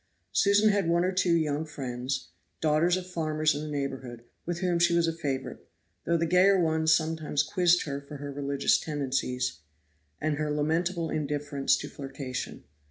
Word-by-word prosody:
Susan 205 +2 +4
had 200 -4 +1
one 170 +1 +3
or 185 - +1
two 185 -2 +2
young 155 -2 0
friends, 130 -3 -4 0.3
daughters 160 +3 +3
of 185 - -5
farmers 155 -3 0
in 145 - -4
the 155 - -5
neighborhood, 135 -4 -4 0.2
with 175 -1 -1
whom 175 -2 +1
she 170 0 +4
was 170 -1 +3
a 165 - 0
favorite, 140 -5 -4 0.4
though 170 +1 +2
the 165 - +1
gayer 185 +3 +5
ones 160 -1 +2
sometimes 155 -2 +1
quizzed 175 +2 +3
her 140 -2 -4
for 145 +1 -9
her 145 0 -6
religious 140 0 +1
tendencies, 130 - -2 0.6
and 155 -1 -1
her 150 0 -1
lamentable 165 +3 0
indifference 145 -2 0
to 145 - -6
flirtation. 135 -2 -6
155 Hz, 165 wpm, -28 LUFS, 140-170 Hz, 0.6 s, gayer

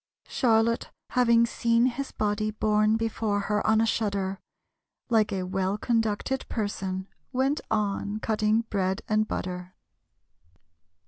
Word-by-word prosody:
Charlotte 230 -3 +2 0.2
having 235 -2 +4
seen 235 0 +2
his 260 +2 -2
body 215 0 -1
Borne 215 0 +2
before 220 -2 -1
her 210 +1 -1
on 220 0 +4
a 225 - +4
shutter, 200 -3 -1 0.7
Like 220 -2 +3
a 190 -2 -1
well 190 +2 -1
conducted 225 +3 -1
person, 190 -3 -3 0.2
Went 270 +3 +1
on 210 -1 -1
cutting 215 0 +1
bread 195 -3 -2
and 215 0 +2
butter. 180 0 -5
215 Hz, 120 wpm, -27 LUFS, 200-230 Hz, 0.7 s, having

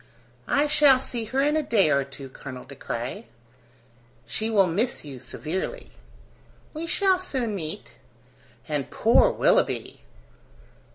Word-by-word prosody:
"I 285 +1 +2
shall 295 -3 +5
see 240 -3 -3
her 260 +5 0
in 295 +1 +2
a 310 - +2
day 210 - +2
or 140 -1 +3
two, 135 0 -10
Colonel 130 -1 -9
De 140 - -11
Craye." 130 - -5 1.0
"She 220 - -2
will 205 -4 +4
miss 200 +4 0
you 135 -3 -8
severely." 190 - -5 0.8
"We 325 +2 -4
shall 380 +1 +3
soon 260 - -2
meet." 180 +1 -6 0.7
"And 150 -3 -2
poor 235 - +4
Willoughby!" - - +1
220 Hz, 130 wpm, -25 LUFS, -, 1.0 s, shall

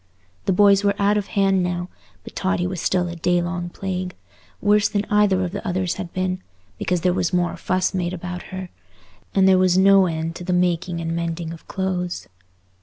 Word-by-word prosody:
The - - +2
boys 200 +1 +5
were 200 0 +2
out 200 +1 +3
of 205 -2 -1
hand 195 -2 +2
now, 180 0 -2 0.4
but - - -11
Totty 185 -2 0
was 180 -2 -3
still 180 -1 +1
a 170 - -5
day 175 +1 +1
long 175 0 -3
plague, 185 0 -4 0.4
worse 205 0 +3
than 205 -1 -1
either 205 -3 +3
of 180 - -3
the - - -5
others 180 -1 0
had 185 -3 -5
been, 185 0 -2 0.4
because 180 -2 0
there 180 0 +2
was 175 - 0
more 175 -1 +1
fuss 185 +1 0
made 180 -2 -1
about 180 0 -5
her. 185 -1 -6 0.6
And 190 -1 +5
there 190 -1 +6
was 185 -1 +3
no 195 0 +6
end 165 0 -3
to 180 - -8
the 180 0 -1
making 175 -1 0
and 165 0 -2
mending 170 0 -3
of 165 - -13
clothes. 185 -2 -3
185 Hz, 200 wpm, -22 LUFS, 175-190 Hz, 0.6 s, there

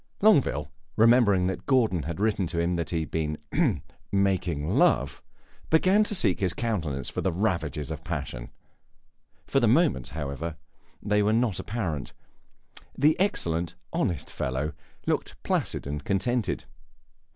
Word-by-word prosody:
Longueville, 130 - +3 0.2
remembering 110 -5 +5
that 95 0 -3
Gordon 115 - +3
had 80 +4 -5
written 105 -3 +1
to 85 - -2
him 85 +1 +1
that 85 -1 -2
he 85 -2 0
had 80 - -6
been 75 -2 -1 0.7
"making 95 -6 +1
love," - - +2 0.5
began 185 +6 +4
to 210 - -1
seek 95 - +2
in 95 - +1
his 90 - 0
countenance 80 - -2
for - - -3
the 95 - +1
ravages 85 - -1
of - - -6
passion. - - -5 1.0
For - - +2
the - - +3
moment, 65 -2 +3
however, 75 +1 -4 0.5
they 105 0 +2
were 105 +1 +2
not 115 -4 +1
apparent; 90 - -3 0.8
the 150 +3 +4
excellent, 85 - 0 0.2
honest 85 -8 -1
fellow 70 +5 -2 0.3
looked - - -1
placid - - -1
and 70 +1 -4
contented. 110 - 0
90 Hz, 140 wpm, -27 LUFS, 80-110 Hz, 1.0 s, remembering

